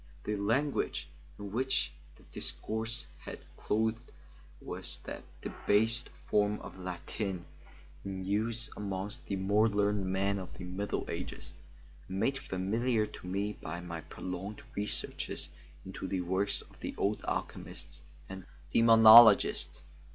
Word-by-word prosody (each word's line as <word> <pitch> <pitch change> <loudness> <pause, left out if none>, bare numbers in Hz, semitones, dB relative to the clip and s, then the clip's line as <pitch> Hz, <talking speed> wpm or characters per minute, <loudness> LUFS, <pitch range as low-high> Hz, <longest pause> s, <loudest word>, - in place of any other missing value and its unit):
The 105 - -1
language 115 - 0 0.3
in 100 -1 -7
which 110 - +1 0.2
the - - -20
discourse 115 +3 -2 0.2
was - - -6 0.2
clothed 110 +2 -1 0.5
was - - -5
that - - -6 0.2
debased 115 +4 +2 0.2
form 105 0 +2
of - - -10
Latin 90 0 -4 0.6
in 95 -1 -5
use 115 +6 0
amongst 100 0 -4
the 100 - -1
more 100 +4 +3
learned 100 -1 +1
men 100 +1 +1
of 95 - -9
the - - -7
Middle 95 +3 -3
Ages, - - -6 0.5
and 95 +1 -4
made 135 +6 +1
familiar 110 +4 0
to 90 - -10
me 100 +3 -1
by 85 +3 -5
my 85 -2 -6
prolonged 95 +6 -6
researches 105 +1 -2 0.3
into 95 0 -6
the 95 -1 -1
works 95 +3 +1
of - - -20
the - - -5
old 105 +2 0
alchemists 80 -1 -4 0.3
and 95 -1 -8 0.3
demonologists. 115 -5 +8
100 Hz, 130 wpm, -32 LUFS, 95-110 Hz, 0.6 s, demonologists